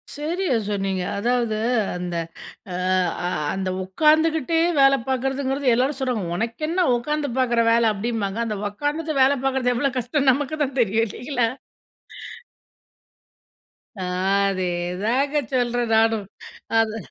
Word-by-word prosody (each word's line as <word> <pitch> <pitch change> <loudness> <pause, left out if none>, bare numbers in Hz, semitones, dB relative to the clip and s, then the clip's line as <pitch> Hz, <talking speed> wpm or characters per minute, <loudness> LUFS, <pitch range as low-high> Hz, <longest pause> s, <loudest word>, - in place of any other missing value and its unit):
சரியா 315 0 -1
சொன்னீங்க. 195 -2 -1 0.2
அதாவது 235 0 0 0.4
அந்த 180 -1 -4 0.6
அ - - -3 0.5
அ - - +1 0.3
அந்த 190 -1 -2
உட்காந்துகிட்டே 315 - +2 0.2
வேலை 275 0 +6
பார்க்கறதுங்கிறது, 270 +1 -1
எல்லாரும் 260 +3 0
சொல்றாங்க. 250 -7 -1
"உனக்கென்ன 305 - -1
உக்காந்து 295 +4 -2
பாக்குற 235 -2 +2
வேலை." 230 -1 +4
அப்படீம்பாங்க. 210 -1 -3
அந்த 215 -2 -3
உட்காந்துட்டு 295 +8 -3
வேலை 270 +1 +4
பாக்கறது 260 -2 +1
எவ்வளோ 275 +2 +1
கஷ்டம்னு 265 +3 +2
நமக்குதான் 285 0 -2
தெரியும். 225 +1 +2
இல்லைங்களா? 245 +2 -1 2.5
அ - - -6 0.5
அதேதாங்க 190 +10 -1
சொல்றேன் 245 -2 0
நானும். 225 -2 +2 0.5
அது 225 0 0
245 Hz, 110 wpm, -23 LUFS, 220-285 Hz, 2.5 s, வேலை